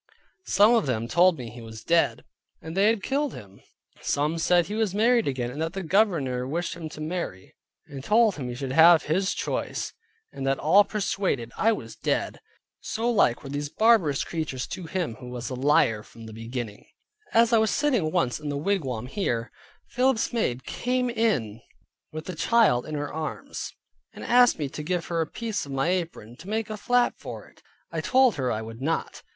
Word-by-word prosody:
Some 205 +4 +5
of 225 -9 +2
them 115 -3 -1
told 175 +5 +4
me 120 -4 -7
he 120 +1 -10
was 110 0 -10
dead, 170 0 +2 0.4
and 160 +1 -8
they 195 +2 +4
had 220 -3 +1
killed 280 0 -1
him; 100 -4 -12 0.4
some 150 +3 0
said 175 +1 +3
he 205 - -6
was 215 -3 0
married 235 +2 +3
again, 125 -3 -2
and 145 +5 -6
that 165 +1 -2
the 195 -1 -4
Governor 155 - +1
wished 170 +3 -2
him 165 -2 -7
to 155 - -11
marry; 155 - -5 0.3
and 135 -2 -9
told 220 +4 +4
him 130 -4 -4
he 120 - -5
should 130 0 -4
have 165 +3 +7
his 190 +5 0
choice, - - -3 0.4
and 135 - -7
that 135 0 +2
all 190 +7 +5
persuaded 190 - -2
I 225 - +3
was 220 - -5
dead. - - -2 0.4
So 230 +2 -1
like 125 - +2
were 135 - -8
these 145 0 -3
barbarous 210 -9 +3
creatures 155 -6 -4
to 185 -3 -6
him 165 -9 -3
who 125 -1 -9
was 125 0 -5
a - - -2
liar 130 -4 +2
from 115 +1 -14
the 110 - -9
beginning. 115 -1 -6 0.5
As 230 +1 +4
I 225 - +6
was 220 0 +2
sitting 245 - +1
once 155 -8 0
in 150 -1 -5
the 145 - -2
wigwam 140 - -1
here, 120 - -2 0.4
Philip's 250 -2 +1
maid 130 - -1
came 250 0 -1
in 145 - 0 0.5
with 155 0 -7
the 185 - -5
child 190 - +3
in 155 - -4
her 145 0 -4
arms, 160 - -5 0.4
and - - -9
asked 245 0 +5
me 150 -3 -2
to 150 - -6
give 170 +2 -2
her 170 -1 0
a 160 - -1
piece 225 -7 -4
of - - -8
my 135 +4 0
apron, 165 - -3
to 185 - -11
make 220 0 -2
a - - -3
flap 245 +3 +1
for - - -8
it. - - -22 0.3
I - - -2
told 260 -6 +3
her 130 -3 0
I 110 +1 -2
would 115 +2 -9
not. 160 +4 -2
160 Hz, 200 wpm, -26 LUFS, 130-210 Hz, 0.5 s, have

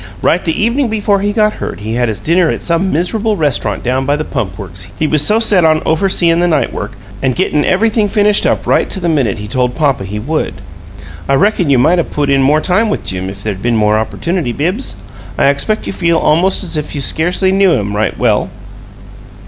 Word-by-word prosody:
Right 175 - +2
the 160 - -1
evening 235 +5 +1
before 210 -2 0
he 205 +1 0
got 215 0 +2
hurt - - -5
he 110 +2 -4
had 120 0 0
his 105 -3 -4
dinner 170 - +2
at - - -3
some 175 +3 0
miser'ble 210 +6 -1
rest'rant 130 - -1
down 130 +2 0
by 145 - +2
the 155 +1 -3
Pump 95 -3 -4
Works, 95 -2 -8
he 155 - 0
was 150 -1 +2
so 210 +8 +3
set 205 -6 +4
on 155 -1 +4
overseein' 170 0 +2
the 175 - +2
night 155 -4 0
work 105 - -5 0.3
and 130 -2 0
gettin' 145 +5 +1
everything 215 +2 +1
finished 210 0 +2
up - - 0
right - - +1
to 195 - -3
the 175 - -2
minute 135 - +1
he 105 0 -7
told 125 +2 -1
papa 140 -9 0
he 100 +2 -5
would. 150 +9 -2 0.7
I 140 - +4
reckon 190 -1 +1
you 135 - +4
might 165 +8 +3
'a' - - +2
put 145 -2 -2
in 135 0 +3
more 150 +3 +3
time 215 +6 +1
with - - -3
Jim 95 0 -3
if 100 +1 -9
there'd 100 -3 -4
been 120 0 +1
more 105 0 +2
opportunity, 165 +5 -2
Bibbs. 180 - -2 0.4
I - - +4
expect 175 +10 -1
you - - -4
feel 170 -3 +1
almost 175 +6 +2
as 175 - -4
if 150 - -4
you 140 - -3
scarcely 175 +6 0
really 190 - +1
knew 195 -3 +4
him 105 -5 -2
right 110 +1 -1
well." - - +1
155 Hz, 230 wpm, -14 LUFS, 120-190 Hz, 0.7 s, set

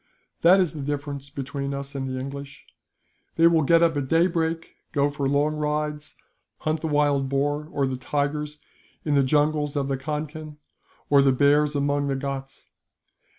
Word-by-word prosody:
That 180 +3 +6
is 180 -4 +1
the 150 - -6
difference 140 0 -4
between 140 0 -4
us 140 0 -6
and 135 -1 -3
the 130 0 -3
English. 140 +1 -8 0.7
These 165 0 +6
will 165 -1 +3
get 165 +3 +4
up 165 -2 +3
at 140 -2 -2
daybreak, 165 0 +1 0.2
go 145 0 +2
for 140 -2 -1
long 145 +2 +2
rides, 150 0 -3 0.5
hunt 155 0 -1
the 160 - -2
wild 145 -3 +2
boar 145 +2 0
or 140 - 0
the 130 -1 -2
tigers 150 +3 -2 0.5
in 150 - +1
the 140 - +5
jungles 150 +1 +1
of 140 -1 -1
the 135 - 0
Concan, 150 +2 -5 0.5
or 140 -1 +7
the 135 -1 +4
bears 145 +3 +3
among 145 0 0
the 135 - 0
Ghauts. 135 0 -5
145 Hz, 170 wpm, -25 LUFS, 140-150 Hz, 0.7 s, or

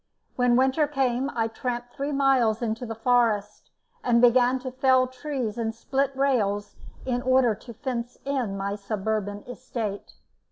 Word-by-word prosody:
When 245 -1 +3
winter 265 +4 +3
came 270 -2 0
I 225 -1 +1
tramped 245 +1 -4
three 280 +2 -3
miles 260 -5 +2
into 225 +2 -2
the 225 - -5
forest, 225 -3 +1 0.3
and 235 -1 +3
began 245 +1 +5
to 260 0 -5
fell 260 0 +3
trees 255 -3 -4
and 225 -1 -2
split 270 +3 -1
rails 215 -7 0 0.3
in 245 -1 -1
order 255 -2 +3
to 235 +3 -11
fence 245 -1 -4
in 255 -8 -1
my 200 +1 -2
suburban 205 0 -3
estate. 235 -5 -5
245 Hz, 150 wpm, -26 LUFS, 225-260 Hz, 0.3 s, began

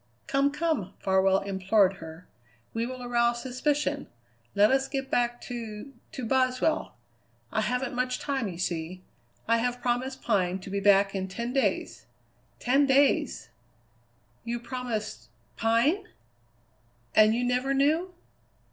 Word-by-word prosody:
"Come, 275 +1 +2
come," 300 - -2
Farwell 190 0 +3
implored 195 0 +2
her; 160 +2 -10 0.5
"we 230 +1 -1
will 255 0 -7
arouse 240 0 +1
suspicion. 280 +2 -1 0.5
Let 205 +3 +5
us 270 0 +2
get 270 -1 -4
back 240 0 +1
to 235 +1 -7 0.2
to 260 -6 -4
Boswell. 255 +4 +1 0.6
I 220 - +1
haven't 250 +4 -1
much 250 0 -1
time, 270 -6 -2
you 175 -3 -6
see. 175 +1 -3 0.4
I 230 +1 +4
have 245 +1 -1
promised 250 +2 -2
Pine 190 -5 +1
to 190 - -9
be 200 - 0
back 200 0 +4
in 190 -1 -2
ten 235 +6 -4
days. 270 - -1 0.5
Ten 275 +3 +3
days!" 285 +3 +2 0.9
"You 235 0 -3
promised 230 - -5 0.3
Pine?" 235 - +2 1.1
"And 215 +1 +6
you 245 - 0
never 250 +2 0
knew?" 305 +7 +2
240 Hz, 130 wpm, -28 LUFS, 200-265 Hz, 1.1 s, And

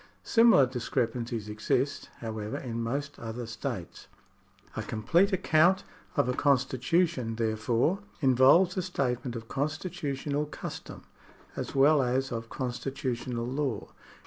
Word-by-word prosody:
Similar 230 - +6
discrepancies 120 -3 -2
exist, 125 +6 -1
however, 110 -2 -4
in 115 -2 -4
most 140 +5 -3
other 115 +1 -5
states. 110 -1 -6 0.7
A - - -2
complete 170 - +2
account 180 0 +3 0.3
of 145 -5 +2
a 125 - +1
constitution, 135 0 +1
therefore, 115 - +1 0.2
involves 135 +7 +5
a 185 - 0
statement 130 -8 -2
of 115 -1 -7
constitutional 145 0 -2
custom - - -8 0.5
as - - -5
well 140 +2 +5
as 130 +1 0
of 115 -1 -4
constitutional 125 -2 -3
law. 130 -3 -2
130 Hz, 115 wpm, -29 LUFS, 115-150 Hz, 0.7 s, Similar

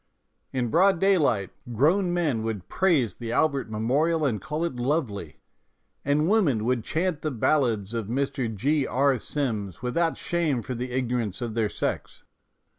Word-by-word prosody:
In 125 -3 -1
broad 190 - +4
daylight 145 - +2 0.2
grown 175 - +3
men 160 -10 0
would 110 -5 -4
praise 160 - +1
the 115 -1 -5
Albert 140 -3 +1
Memorial 145 +9 +1
and 110 -8 0
call 155 - -3
it 150 -7 -4
lovely, 120 - -2 0.7
and 145 +3 +2
women 160 - +2
would 125 -2 +1
chant 160 +3 -1
the 155 - -1
ballads 120 -5 +1
of 115 -3 -3
Mr. 135 0 -1
G. 135 +7 0
R. 135 -1 +2
Sims 110 - -3
without 165 +7 0
shame 155 -9 0
for 130 - -4
the 125 +1 -4
ignorance 120 -5 -1
of 120 -3 -4
their 110 -2 0
sex. - - -4
130 Hz, 155 wpm, -26 LUFS, 115-155 Hz, 0.7 s, broad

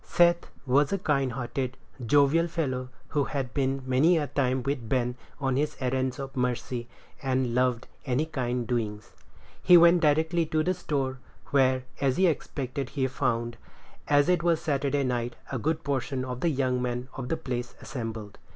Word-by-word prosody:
Seth 170 0 +3 0.2
was 140 +2 +3
a 195 - +1
kind 135 -8 0
hearted, 130 +1 -3 0.3
jovial 145 +6 +4
fellow, 130 -6 -2 0.2
who 145 -2 +1
had 135 -4 -3
been 135 -1 0
many 140 +7 +4
a 150 - 0
time 130 -2 0
with 130 -4 -3
Ben 125 -2 +1 0.3
on 135 -2 0
his 150 +1 -1
errands 130 -1 -1
of 135 -1 -6
mercy, 125 -1 -2 0.3
and 130 -3 0
loved 125 -1 +1 0.2
any 135 +3 0
kind 125 -6 -2
doings. 110 -3 -3 0.5
He 180 - +8
went 170 +1 +6
directly 160 +2 +2
to 155 0 +1
the 185 - +1
store, 135 -7 -2 0.3
where, 130 -2 +3 0.2
as 135 -2 +2
he 190 - +4
expected, 140 -5 -2
he 135 -3 -1
found, 120 -2 -1 0.5
as 145 +1 +4
it 180 -2 +3
was 170 -2 +2
Saturday 140 -1 0
night, 120 -2 -1 0.2
a 130 - -2
good 160 +6 -1
portion 135 -2 -2
of 125 -1 -5
the 170 - +1
young 130 -3 0
men 125 0 -2
of 125 -2 -6
the 165 - 0
place 120 -1 -4
assembled. 115 -6 -6
135 Hz, 170 wpm, -27 LUFS, 125-150 Hz, 0.5 s, He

